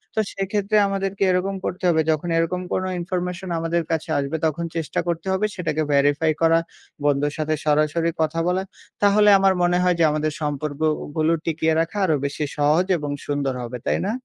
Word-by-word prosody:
তো - - +1
সেক্ষেত্রে 200 +2 0
আমাদেরকে 195 0 -2
এরকম 190 +2 0
করতে 185 +2 -4
হবে 160 -1 +3
যখন 155 +2 -2
এরকম 165 +2 0
কোনো 185 0 -1
information 180 +1 -3
আমাদের 165 +1 0
কাছে 160 0 -2
আসবে 140 +3 -2
তখন 165 +2 -1
চেষ্টা 165 -2 -2
করতে 170 +2 -2
হবে 190 +3 +1
সেটাকে 155 -4 -1
verify 145 +3 +3
করা, 165 0 +5 0.5
বন্ধুর 145 0 +1
সাথে 155 0 -1
সরাসরি 155 +3 +2
কথা 160 +1 0
বলা। 185 +1 +1 0.4
তাহলে 210 +1 +5
আমার 195 0 +4
মনে 175 0 +3
হয় 180 -1 +3
যে - - +4
আমাদের 155 0 -1
সম্পর্কগুলো 155 +2 -1
টিকিয়ে 160 0 +1
রাখা 165 +5 -4
আরও 160 -4 +2
বেশি 140 +2 -3
সহজ 150 +5 +3
এবং 145 -2 -4 0.2
সুন্দর 145 -2 -1
হবে। 120 +1 -5
তাই - - +1
না? 215 - -1
165 Hz, 175 wpm, -22 LUFS, 150-180 Hz, 0.5 s, করা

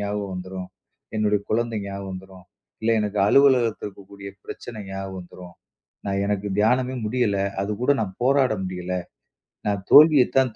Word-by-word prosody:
ஞாபகம் 100 -1 -3
வந்துரும். 95 0 -6 0.5
என்னோட 105 -1 +2
குழந்தை 115 0 0
ஞாபகம் 100 0 -6
வந்துரும். 95 -1 -11 0.4
இல்ல 115 - +2
எனக்கு 105 -1 -2
அலுவலகத்துல 125 -3 +4
இருக்கக்கூடிய 100 0 -11 0.2
பிரச்சனை 120 -2 -8
ஞாபகம் 95 0 -6
வந்துரும். 90 -1 -11 0.5
நான் 100 0 0
எனக்கு 105 0 -1
தியானமே 125 +4 +2
முடியல. 110 -3 0 0.2
அதுக் 105 +2 -4
கூட 125 - +2
நான் 95 -3 -6
போராட 135 -1 +3
முடியல. 90 -1 -5 0.8
நான் 100 -2 -1
தோல்வியத் 150 -4 +7
தான் 130 -4 +2
105 Hz, 140 wpm, -23 LUFS, 95-120 Hz, 0.8 s, தோல்வியத்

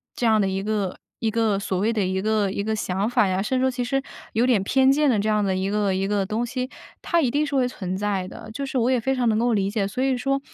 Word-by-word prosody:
这 245 - -1
样 220 -2 +4
的 195 - +1
一 190 0 -2
个 205 -3 -2 0.2
一 220 -1 0
个 220 -3 +1
所 195 -2 -2
谓 220 +4 +1
的 210 - 0
一 190 +1 -1
个 210 -1 +1
一 200 - -2
个 220 +1 -1
想 195 0 -1
法 230 -4 +3
呀， 185 0 0
甚 255 +5 0
至 - - +1
说 260 - +3
其 250 0 -2
实 270 +3 0 0.3
有 230 +3 +2
点 235 -6 +3
偏 265 +5 +4
见 295 +1 +3
的 225 -5 +2
这 210 +2 0
样 210 -1 +2
的 190 -1 0
一 190 +1 -1
个 205 -2 +1
一 190 +1 -1
个 200 -1 0
东 220 +5 -1
西， 255 +1 -3 0.3
它 340 - +1
一 255 -6 +1
定 295 +1 +1
是 285 -1 -3
会 255 -2 +3
存 185 -6 -4
在 200 -2 -1
的， 190 - -10
就 275 +4 -3
是 270 - -3
我 240 0 +2
也 255 - +3
非 265 +3 0
常 250 -2 +1
能 215 0 +2
够 240 0 +2
理 195 -2 +1
解。 200 -2 -1
所 250 +6 -2
以 265 -1 +2
说 275 +2 0
220 Hz, 325 characters per minute, -24 LUFS, 195-250 Hz, 0.3 s, 样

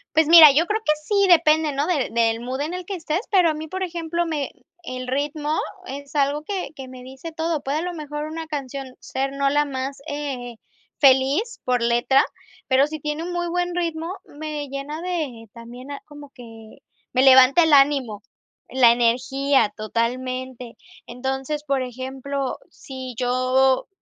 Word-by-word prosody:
Pues 320 -1 +4
mira, 320 -2 +10
yo 305 +5 +3
creo 430 +4 -1
que 305 - +3
sí, 400 +3 +2
depende, 315 -3 +4
¿no?, 280 +2 0
de 310 -7 0
del 230 -1 +1
mood 255 +3 -4
en 310 +4 -3
el 365 0 -5
que 390 - -4
estés, 325 0 -2
pero 365 -4 +4
a - - -3
mí, 310 +1 -6
por 375 +4 -4
ejemplo, 340 -1 -2
me 305 -4 -2 0.3
el 255 -4 -6
ritmo 295 +3 -2 0.3
es 280 -1 -9
algo 290 +1 +1
que 385 +2 -4
que 265 -2 -8
me 255 -1 -11
dice 265 +6 -9
todo. 320 -1 -2
Puede 280 +3 -2
a - - -2
lo 355 +1 -4
mejor 295 -2 -5
una 320 +1 -6
canción 275 -3 -6
ser 270 +1 -3
no 275 0 +1
la 295 +1 +2
más, 275 0 -5
eh, 270 -5 -5 0.4
feliz 275 - +3
por 250 -2 0
letra, 240 +3 +3 0.4
pero 265 +2 +4
si 310 0 -6
tiene 300 +1 -3
un 355 - -5
muy 350 0 -2
buen 355 0 -1
ritmo, 335 0 -3
me 300 -1 -6
llena 275 +3 -5
de 305 -11 -4
también 245 +3 -11
a 280 - -6
como 290 -2 -13
que 225 -3 -13 0.3
me 255 - +3
levanta 265 +4 +7
el 320 - +3
ánimo 275 -7 +3 0.5
la 250 -2 +5
energía, 245 +1 +2
totalmente. 250 +2 -3 0.3
Entonces, 265 +4 -4
por 275 -2 0
ejemplo, 265 +2 -4
si 260 -2 -9
yo, 255 +1 +2
280 Hz, 175 wpm, -22 LUFS, 255-315 Hz, 0.5 s, mira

